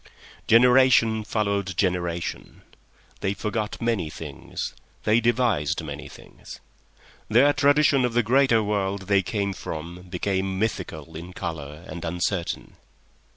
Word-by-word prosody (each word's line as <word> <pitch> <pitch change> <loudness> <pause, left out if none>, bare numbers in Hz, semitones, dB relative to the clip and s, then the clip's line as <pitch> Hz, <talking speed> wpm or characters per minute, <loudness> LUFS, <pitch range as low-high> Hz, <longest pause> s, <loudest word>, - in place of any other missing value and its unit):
Generation 120 -2 +5
followed 100 -4 -1
generation. 85 -3 -2 0.6
They 95 +1 -1
forgot 105 +1 -3
many 115 -9 0
things; 75 -2 -6 0.3
they 110 +2 +4
devised 120 - +1
many - - -7
things. - - -13 0.7
Their 130 +7 +5
tradition 145 -2 +4
of 125 -2 0
the 120 0 +3
greater 120 -1 +4
world 100 -1 -1
they 100 0 +3
came 100 -3 -2
from 85 0 -7
became 95 +1 -1
mythical 85 -7 -3
in 85 +3 -8
colour 75 -2 -6
and 85 - -7
uncertain. 85 +1 -2
100 Hz, 115 wpm, -25 LUFS, 85-115 Hz, 0.7 s, Generation